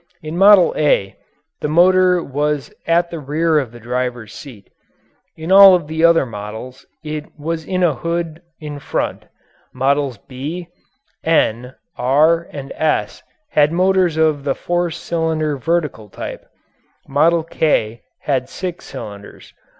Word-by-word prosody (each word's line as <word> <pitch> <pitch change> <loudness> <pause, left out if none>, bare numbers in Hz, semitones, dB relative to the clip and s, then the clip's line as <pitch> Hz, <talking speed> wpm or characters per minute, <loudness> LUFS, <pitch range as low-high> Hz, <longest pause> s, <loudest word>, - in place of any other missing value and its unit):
In 155 +1 -5
"Model 195 0 +6
A" 140 -10 +1 0.4
the - - -2
motor 180 +2 +4
was 145 +1 -2
at 170 +1 +2
the 165 - -5
rear 155 +2 +1
of 130 -6 -4
the 120 - -12
driver's 120 -2 -4
seat. 115 -9 -12 0.7
In 160 +3 -5
all 195 -1 +9
of 175 -4 -2
the 160 +2 -3
other 170 -3 +5
models 110 +3 -8 0.2
it 150 0 -5
was 160 +1 -4
in 185 -1 -1
a 170 -4 +3
hood 165 +3 -4 0.2
in 150 -2 -7
front. - - -3 0.5
Models 135 -1 0
"B," 150 - -7 0.5
"N," 125 -6 +1 0.2
"R," 155 +6 +3
and 140 -1 -8
"S" 155 -1 -1 0.3
had 150 0 +3
motors 185 -1 +2
of 155 -3 +2
the 140 -1 -1
four 175 0 -1
cylinder 160 -2 -2
vertical 150 -7 -2
type. - - -8 0.6
"Model 160 +4 +2
K" 130 -9 0 0.2
had 130 -3 -1
six 180 -2 -6
cylinders. 100 -1 -10
155 Hz, 135 wpm, -18 LUFS, 130-170 Hz, 0.7 s, all